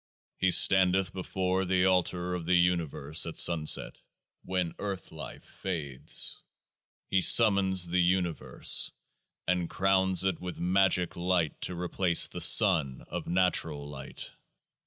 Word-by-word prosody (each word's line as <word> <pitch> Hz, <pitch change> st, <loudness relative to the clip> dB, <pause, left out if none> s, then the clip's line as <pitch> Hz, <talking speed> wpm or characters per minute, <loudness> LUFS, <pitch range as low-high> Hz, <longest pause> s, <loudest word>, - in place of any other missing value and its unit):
He 95 Hz, -, +1 dB
standeth 95 Hz, 0 st, +3 dB
before 95 Hz, 0 st, -3 dB
the 90 Hz, 0 st, 0 dB
Altar 90 Hz, -1 st, -1 dB
of 85 Hz, -2 st, -6 dB
the 90 Hz, -, +2 dB
Universe 85 Hz, -3 st, 0 dB
at 80 Hz, -, -8 dB
Sunset, 80 Hz, -3 st, +1 dB, 0.4 s
when 90 Hz, -2 st, -3 dB
Earth 100 Hz, -3 st, -7 dB
life -, -, -10 dB
fades. 75 Hz, -9 st, -3 dB, 0.7 s
He 95 Hz, -, +2 dB
summons 95 Hz, -4 st, +4 dB
the 90 Hz, +1 st, 0 dB
Universe, 90 Hz, -1 st, +2 dB, 0.6 s
and 90 Hz, -2 st, -2 dB
crowns 95 Hz, -1 st, +1 dB
it 95 Hz, -3 st, -2 dB
with 90 Hz, -1 st, -8 dB
MAGICK 90 Hz, 0 st, 0 dB
Light 85 Hz, -3 st, -2 dB
to 90 Hz, -, -3 dB
replace 90 Hz, 0 st, +1 dB
the -, -, -8 dB
sun 80 Hz, -, +3 dB
of 85 Hz, -1 st, -7 dB
natural 85 Hz, -5 st, -1 dB
light. 70 Hz, -1 st, -9 dB
90 Hz, 125 wpm, -27 LUFS, 85-95 Hz, 0.7 s, summons